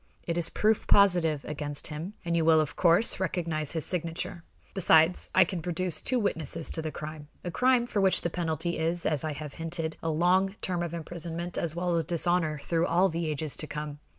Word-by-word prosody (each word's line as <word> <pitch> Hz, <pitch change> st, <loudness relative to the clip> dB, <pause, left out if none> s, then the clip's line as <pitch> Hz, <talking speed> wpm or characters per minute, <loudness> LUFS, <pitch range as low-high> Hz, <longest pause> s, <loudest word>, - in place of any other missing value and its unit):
It 170 Hz, -, -2 dB
is 170 Hz, -1 st, +1 dB
proof 215 Hz, 0 st, +1 dB
positive 175 Hz, -7 st, +4 dB
against 145 Hz, -1 st, -4 dB
him, 165 Hz, +7 st, -6 dB
and 170 Hz, 0 st, 0 dB
you 165 Hz, -, +2 dB
will, 160 Hz, 0 st, +5 dB
of 155 Hz, -2 st, -1 dB
course, 175 Hz, +5 st, +3 dB
recognize 165 Hz, -5 st, -2 dB
his 160 Hz, -3 st, -1 dB
signature. 170 Hz, 0 st, -3 dB, 0.3 s
Besides, 165 Hz, -2 st, +4 dB
I 185 Hz, -, +7 dB
can 175 Hz, -1 st, -4 dB
produce 175 Hz, 0 st, -2 dB
two 255 Hz, -, 0 dB
witnesses 165 Hz, -, -1 dB
to 160 Hz, -, -1 dB
the 155 Hz, -1 st, -4 dB
crime 150 Hz, 0 st, -8 dB, 0.2 s
a 175 Hz, -, -4 dB
crime 250 Hz, +5 st, +3 dB
for 215 Hz, -4 st, -1 dB
which 190 Hz, -1 st, +3 dB
the 170 Hz, -, -1 dB
penalty 170 Hz, 0 st, -2 dB
is, 165 Hz, +2 st, 0 dB
as 150 Hz, -4 st, +1 dB
I 155 Hz, -1 st, -2 dB
have 150 Hz, -1 st, -7 dB
hinted, 165 Hz, -1 st, -2 dB
a 165 Hz, -, -2 dB
long 185 Hz, +5 st, +2 dB
term 180 Hz, -2 st, -2 dB
of 170 Hz, -1 st, -3 dB
imprisonment 170 Hz, +1 st, -5 dB
as 165 Hz, -1 st, -1 dB
well 175 Hz, 0 st, 0 dB
as 165 Hz, -, +1 dB
dishonor 170 Hz, -2 st, +1 dB
through 165 Hz, 0 st, +1 dB
all 180 Hz, +3 st, +3 dB
the 165 Hz, 0 st, -2 dB
ages 150 Hz, -2 st, -1 dB
to 155 Hz, -, -3 dB
come. 150 Hz, -1 st, -6 dB
165 Hz, 205 wpm, -28 LUFS, 155-180 Hz, 0.3 s, I